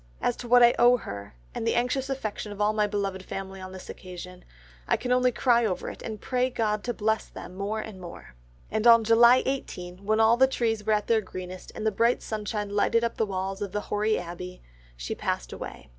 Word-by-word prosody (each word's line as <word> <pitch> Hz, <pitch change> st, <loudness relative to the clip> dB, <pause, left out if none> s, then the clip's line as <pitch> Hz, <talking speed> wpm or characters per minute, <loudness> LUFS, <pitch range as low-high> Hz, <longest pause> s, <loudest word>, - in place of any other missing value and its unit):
As 245 Hz, -, 0 dB
to 245 Hz, -, -7 dB
what 245 Hz, +1 st, +7 dB
I 240 Hz, -, +7 dB
owe 245 Hz, +1 st, +6 dB
her, 100 Hz, -, -8 dB, 0.2 s
and 225 Hz, -, -3 dB
the -, -, +2 dB
anxious 255 Hz, +3 st, 0 dB
affection 220 Hz, -5 st, -4 dB
of 205 Hz, -, -9 dB
all 210 Hz, +1 st, +2 dB
my 210 Hz, -1 st, +2 dB
beloved 200 Hz, -2 st, -2 dB
family 190 Hz, 0 st, -7 dB
on 185 Hz, 0 st, -8 dB
this 185 Hz, 0 st, -10 dB
occasion, 180 Hz, 0 st, -9 dB, 0.4 s
I -, -, +2 dB
can 250 Hz, -, -4 dB
only 250 Hz, 0 st, +4 dB
cry 240 Hz, -1 st, +3 dB
over 195 Hz, -5 st, -2 dB
it, -, -, -12 dB
and 215 Hz, -2 st, -6 dB
pray 255 Hz, +3 st, 0 dB
God 215 Hz, -4 st, -1 dB
to 240 Hz, -, -1 dB
bless 220 Hz, 0 st, 0 dB
them -, -, -10 dB
more 200 Hz, +3 st, -3 dB
and 215 Hz, -3 st, -8 dB
more." 170 Hz, -, -10 dB, 0.4 s
And 220 Hz, +2 st, +1 dB
on 230 Hz, -1 st, +8 dB
July 235 Hz, +3 st, +6 dB
18, 185 Hz, -9 st, -4 dB
when 215 Hz, +2 st, +1 dB
all 225 Hz, +1 st, +5 dB
the 265 Hz, +1 st, +6 dB
trees 225 Hz, -5 st, -1 dB
were 215 Hz, +1 st, +2 dB
at 210 Hz, -1 st, +1 dB
their 225 Hz, -1 st, +3 dB
greenest, 185 Hz, -1 st, -8 dB
and 215 Hz, -, -5 dB
the 220 Hz, -, +3 dB
bright 230 Hz, +4 st, +2 dB
sunshine 210 Hz, -1 st, -3 dB
lighted 210 Hz, +3 st, +2 dB
up 235 Hz, -, -1 dB
the 220 Hz, -, +1 dB
walls 195 Hz, +1 st, -3 dB
of 200 Hz, -2 st, -4 dB
the 210 Hz, -, -1 dB
hoary 215 Hz, +1 st, +2 dB
abbey, 180 Hz, +1 st, -7 dB, 0.3 s
she -, -, -4 dB
passed -, -, -3 dB
away. -, -, -8 dB
215 Hz, 225 wpm, -27 LUFS, 190-235 Hz, 0.4 s, on